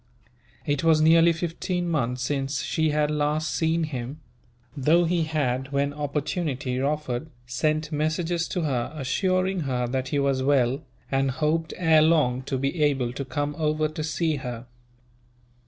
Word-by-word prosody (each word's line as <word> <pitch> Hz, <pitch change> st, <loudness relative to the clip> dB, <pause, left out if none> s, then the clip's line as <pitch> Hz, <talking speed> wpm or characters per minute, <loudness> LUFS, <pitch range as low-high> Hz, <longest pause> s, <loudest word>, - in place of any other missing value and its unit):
It 145 Hz, 0 st, 0 dB
was 160 Hz, -1 st, +5 dB
nearly 165 Hz, +2 st, +6 dB
fifteen 175 Hz, +2 st, -2 dB
months 125 Hz, -6 st, -1 dB
since 135 Hz, 0 st, -1 dB
she 160 Hz, -1 st, 0 dB
had 150 Hz, 0 st, +1 dB
last 150 Hz, +1 st, 0 dB
seen 165 Hz, 0 st, +1 dB
him; 135 Hz, -1 st, -5 dB, 0.6 s
though 155 Hz, +5 st, +3 dB
he 170 Hz, -1 st, +1 dB
had, 135 Hz, -4 st, -1 dB
when 140 Hz, 0 st, 0 dB
opportunity 145 Hz, -2 st, -2 dB
offered, 145 Hz, 0 st, -2 dB, 0.2 s
sent 155 Hz, +5 st, -1 dB
messages 160 Hz, +3 st, 0 dB
to 180 Hz, -, -2 dB
her 130 Hz, -5 st, -1 dB
assuring 185 Hz, +7 st, 0 dB
her 130 Hz, -5 st, -1 dB
that 130 Hz, +1 st, -2 dB
he 145 Hz, -, -1 dB
was 140 Hz, -1 st, +1 dB
well, 135 Hz, 0 st, +2 dB, 0.3 s
and 135 Hz, 0 st, +2 dB
hoped 155 Hz, +4 st, -1 dB
ere 160 Hz, -3 st, +5 dB
long 150 Hz, -6 st, +3 dB
to 140 Hz, -1 st, -2 dB
be 140 Hz, +5 st, -1 dB
able 135 Hz, -5 st, +1 dB
to 140 Hz, -, -4 dB
come 145 Hz, +1 st, -3 dB
over 155 Hz, 0 st, +1 dB
to 155 Hz, 0 st, -5 dB
see 155 Hz, 0 st, 0 dB
her. 125 Hz, -2 st, -6 dB
150 Hz, 155 wpm, -25 LUFS, 135-160 Hz, 0.6 s, nearly